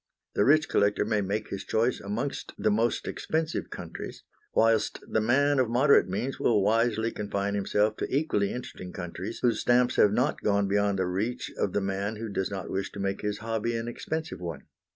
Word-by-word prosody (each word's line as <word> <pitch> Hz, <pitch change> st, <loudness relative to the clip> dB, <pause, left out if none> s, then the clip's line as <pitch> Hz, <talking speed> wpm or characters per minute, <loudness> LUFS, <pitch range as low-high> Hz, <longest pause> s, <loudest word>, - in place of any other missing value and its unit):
The 100 Hz, -, +2 dB
rich 155 Hz, +3 st, +5 dB
collector 100 Hz, 0 st, +2 dB
may 105 Hz, -1 st, +1 dB
make 105 Hz, +3 st, -2 dB
his 100 Hz, -1 st, -4 dB
choice 115 Hz, +3 st, +1 dB
amongst 110 Hz, +8 st, -4 dB
the 110 Hz, -, +2 dB
most 115 Hz, +3 st, +1 dB
expensive 160 Hz, 0 st, -2 dB
countries, -, -, -7 dB, 0.3 s
whilst 115 Hz, -1 st, +3 dB
the 110 Hz, -, +1 dB
man 140 Hz, +5 st, +3 dB
of 125 Hz, -3 st, +2 dB
moderate 130 Hz, -1 st, +4 dB
means 125 Hz, +8 st, -3 dB
will 105 Hz, -4 st, +3 dB
wisely 115 Hz, +1 st, +2 dB
confine 100 Hz, -1 st, -2 dB
himself 105 Hz, +2 st, +1 dB
to -, -, -2 dB
equally 130 Hz, -8 st, +1 dB
interesting 95 Hz, -7 st, -7 dB
countries 95 Hz, +4 st, -6 dB
whose 115 Hz, -3 st, +3 dB
stamps 125 Hz, 0 st, +3 dB
have 105 Hz, -, +6 dB
not 125 Hz, +7 st, +1 dB
gone 100 Hz, -1 st, +2 dB
beyond 100 Hz, 0 st, +1 dB
the 95 Hz, -, +1 dB
reach 105 Hz, +7 st, -2 dB
of 95 Hz, -, -1 dB
the 105 Hz, -, +1 dB
man 100 Hz, +2 st, -2 dB
who 110 Hz, +1 st, -5 dB
does 95 Hz, -1 st, -1 dB
not 95 Hz, -3 st, -5 dB
wish 95 Hz, 0 st, -2 dB
to -, -, -7 dB
make 100 Hz, 0 st, -2 dB
his 105 Hz, 0 st, -2 dB
hobby 115 Hz, +1 st, -1 dB
an 115 Hz, 0 st, -3 dB
expensive 160 Hz, +6 st, -4 dB
one. 85 Hz, -5 st, -5 dB
105 Hz, 195 wpm, -28 LUFS, 100-120 Hz, 0.3 s, have